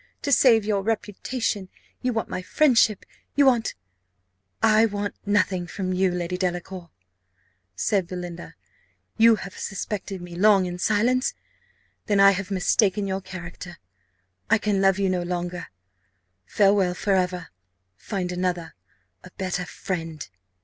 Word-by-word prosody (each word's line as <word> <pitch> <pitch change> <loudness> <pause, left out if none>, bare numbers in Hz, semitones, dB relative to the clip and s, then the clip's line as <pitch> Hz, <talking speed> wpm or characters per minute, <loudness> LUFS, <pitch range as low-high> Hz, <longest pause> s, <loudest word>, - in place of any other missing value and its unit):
To 285 - -1
save 230 -5 +5
your 205 -2 +1
reputation, 210 0 -2 0.3
you 250 - 0
want 225 -2 -2
my 185 - -4
friendship 230 -3 +3 0.3
you 285 - +5
want 240 -4 +2 0.5
" 95 +1 -28 0.2
"I 225 - +5
want 205 -1 -3
nothing 195 -3 +1
from 185 0 -3
you, 185 +1 +2
Lady 180 0 -3
Delacour," 180 -1 -3 0.9
said 190 - 0
Belinda. 175 -1 -7 0.6
"You 225 0 +7
have 195 -2 -8
suspected 195 0 -4
me 175 0 -9
long 195 0 +5
in 175 0 -5
silence! 235 +6 +1 0.7
then 205 -3 +2
I 195 0 +8
have 195 0 -3
mistaken 200 +1 +2
your 190 0 -2
character 175 -1 -9 0.7
I - - +5
can 205 -2 0
love 195 -1 +4
you 200 -1 +1
no 185 -1 0
longer. 175 0 -4 0.8
Farewell 195 -3 +3
for 200 +2 0
ever! 180 -2 0 0.5
Find 180 - -4
another 180 -2 -2 0.5
a - - -11
better 185 -1 -2
friend." 165 -5 -5
190 Hz, 135 wpm, -24 LUFS, 180-210 Hz, 0.9 s, I